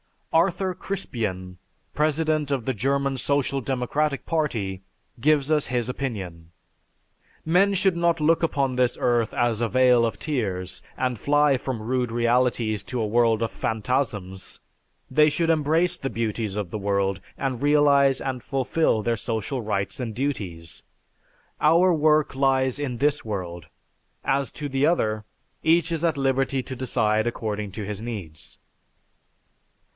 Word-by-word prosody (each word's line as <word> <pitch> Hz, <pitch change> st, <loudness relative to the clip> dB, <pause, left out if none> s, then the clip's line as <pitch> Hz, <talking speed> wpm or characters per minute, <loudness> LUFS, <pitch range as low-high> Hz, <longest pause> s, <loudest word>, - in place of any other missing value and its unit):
Arthur 180 Hz, +3 st, +2 dB
Crispien, 110 Hz, -, -4 dB, 0.4 s
president 155 Hz, -1 st, 0 dB
of 130 Hz, -5 st, -1 dB
the 130 Hz, -, 0 dB
German 135 Hz, +4 st, 0 dB
Social 140 Hz, +1 st, 0 dB
Democratic 135 Hz, +3 st, -1 dB
Party, 110 Hz, -, -1 dB, 0.4 s
gives 150 Hz, +2 st, +2 dB
us 150 Hz, -2 st, +2 dB
his 120 Hz, -1 st, -1 dB
opinion. 95 Hz, -11 st, -5 dB, 0.9 s
"Men 185 Hz, +5 st, +3 dB
should 190 Hz, -2 st, +2 dB
not 170 Hz, -1 st, +1 dB
look 160 Hz, +2 st, +3 dB
upon 135 Hz, -6 st, 0 dB
this 125 Hz, -1 st, +2 dB
earth 120 Hz, -3 st, +1 dB
as 120 Hz, -2 st, +1 dB
a 115 Hz, -, +2 dB
vale 125 Hz, 0 st, +4 dB
of 115 Hz, -, -2 dB
tears 95 Hz, -, -3 dB, 0.2 s
and 125 Hz, -3 st, -1 dB
fly 145 Hz, -1 st, +3 dB
from 125 Hz, -3 st, -4 dB
rude 125 Hz, +1 st, -1 dB
realities 120 Hz, -2 st, +1 dB
to 125 Hz, +3 st, -4 dB
a -, -, 0 dB
world 115 Hz, 0 st, +2 dB
of 115 Hz, -, -2 dB
phantasms; 110 Hz, -5 st, -3 dB, 0.5 s
they 150 Hz, +3 st, +5 dB
should 165 Hz, +2 st, 0 dB
embrace 165 Hz, +3 st, +2 dB
the 135 Hz, -, -3 dB
beauties 110 Hz, -3 st, -2 dB
of 100 Hz, -4 st, -3 dB
the 110 Hz, -, -3 dB
world, 100 Hz, -1 st, 0 dB, 0.2 s
and 130 Hz, -3 st, -2 dB
realize 140 Hz, -2 st, +4 dB
and 130 Hz, -2 st, -3 dB
fulfill 135 Hz, -2 st, 0 dB
their 115 Hz, +1 st, 0 dB
social 115 Hz, +4 st, -3 dB
rights 105 Hz, 0 st, -2 dB
and 115 Hz, -4 st, -4 dB
duties. 95 Hz, -, -4 dB, 0.8 s
Our 170 Hz, +4 st, +5 dB
work 155 Hz, -1 st, +3 dB
lies 135 Hz, 0 st, +1 dB
in 130 Hz, -4 st, -3 dB
this 145 Hz, +2 st, +1 dB
world. 90 Hz, -6 st, -5 dB, 0.6 s
As 135 Hz, 0 st, 0 dB
to 145 Hz, -1 st, -5 dB
the 135 Hz, +1 st, +1 dB
other, 110 Hz, -11 st, +1 dB, 0.4 s
each 165 Hz, +1 st, +3 dB
is 165 Hz, 0 st, 0 dB
at 160 Hz, -3 st, +1 dB
liberty 135 Hz, -1 st, 0 dB
to 130 Hz, -, -6 dB
decide 110 Hz, -3 st, +1 dB
according 105 Hz, -4 st, -3 dB
to 105 Hz, -1 st, -5 dB
his 105 Hz, 0 st, -5 dB
needs." 100 Hz, -10 st, -7 dB
130 Hz, 145 wpm, -24 LUFS, 110-145 Hz, 0.9 s, they